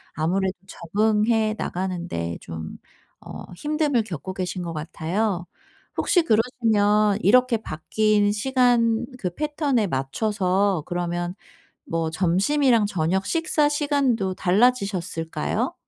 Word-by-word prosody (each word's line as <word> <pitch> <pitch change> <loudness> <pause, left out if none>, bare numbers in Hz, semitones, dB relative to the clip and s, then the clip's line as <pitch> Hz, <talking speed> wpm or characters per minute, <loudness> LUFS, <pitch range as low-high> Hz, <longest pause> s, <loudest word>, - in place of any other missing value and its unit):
아무래도 185 +5 0
적응해 215 +4 +1
나가는데 175 - -3
좀 80 -1 -7 0.4
어 - - -9
힘듦을 295 - 0
겪고 185 -2 -6
계신 185 -1 -3
것 170 -1 -5
같아요. 175 +4 -2 0.5
혹시 355 -4 +3
그러시면 215 -4 +2
이렇게 250 +3 +4
바뀐 210 +3 +1
시간 240 0 +2
그 180 -5 -3
패턴에 290 - 0
맞춰서 185 +5 0
그러면 175 0 -3 0.5
뭐 165 -1 -1
점심이랑 210 - +2
저녁 190 0 0
식사 315 -3 +1
시간도 280 -9 0
달라지셨을까요? 180 - 0
205 Hz, 250 characters per minute, -23 LUFS, 175-235 Hz, 0.5 s, 이렇게